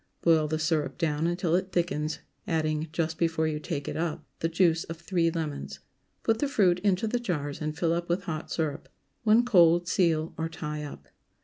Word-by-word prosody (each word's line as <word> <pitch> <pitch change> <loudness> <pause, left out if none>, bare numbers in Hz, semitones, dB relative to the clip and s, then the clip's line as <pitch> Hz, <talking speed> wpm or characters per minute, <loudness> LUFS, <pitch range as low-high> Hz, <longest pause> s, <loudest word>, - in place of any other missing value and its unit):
Boil 160 -2 +4
the 155 +1 -1
syrup 155 -2 0
down 160 -1 0
until 175 -1 0
it 185 +1 +1
thickens, 160 -3 0 0.3
adding, 155 -1 0
just 160 0 -2
before 165 -1 +1
you 150 -1 -2
take 150 -2 -4
it - - -3
up, 165 -1 -2
the 165 - 0
juice 165 -1 +3
of 165 - -6
three 170 0 +1
lemons. 160 -3 -4 0.5
Put 225 -1 +2
the 290 - +1
fruit 185 -9 +3
into 195 +1 +1
the 240 +3 0
jars 150 -11 -3
and 155 0 -3
fill 165 -1 +2
up 170 0 -2
with 180 +3 0
hot 160 -5 -4
syrup. 155 -3 -2 0.3
When 225 +2 +5
cold, 175 -6 +5
seal 165 -4 +1
or 160 0 -1
tie 150 -2 -5
up. 145 - -9
165 Hz, 195 wpm, -28 LUFS, 155-180 Hz, 0.5 s, When